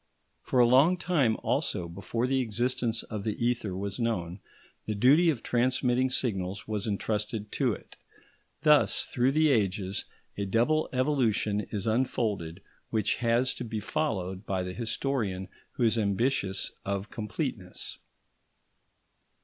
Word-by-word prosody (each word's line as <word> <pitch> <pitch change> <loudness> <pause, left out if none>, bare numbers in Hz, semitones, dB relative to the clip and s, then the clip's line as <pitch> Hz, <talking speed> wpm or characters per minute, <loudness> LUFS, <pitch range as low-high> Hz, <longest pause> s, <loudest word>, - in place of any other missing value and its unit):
For - - -2
a 120 - +8
long 135 +9 +5
time 150 -11 +2
also 85 - 0
before 100 +7 -3
the 135 +1 +1
existence 120 0 0
of 105 -2 -5
the 105 -1 -1
ether 115 -6 -1
was 100 +3 -4
known, 95 -6 -1 0.5
the 110 - -1
duty 145 +11 +5
of 135 -8 -1
transmitting 125 +1 +2
signals 100 -6 -2
was 105 -1 -2
entrusted 105 +1 -2
to - - +1
it. - - -11 0.7
Thus 150 -2 +4
through 125 +2 +1
the 155 0 +4
ages 100 -4 0 0.3
a 100 - 0
double 120 +10 +2
evolution 125 -6 +1
is 100 -3 -3
unfolded 110 -7 -1 0.3
which 110 -3 +1
has 120 +2 +2
to - - -6
be 110 -2 -3
followed 100 - -2
by 95 -1 0
the 90 0 -5
historian 110 -5 -2 0.2
who 125 - -1
is 115 0 +3
ambitious 100 -1 0
of 100 +1 -3
completeness. 105 - -4
115 Hz, 135 wpm, -29 LUFS, 100-130 Hz, 0.7 s, a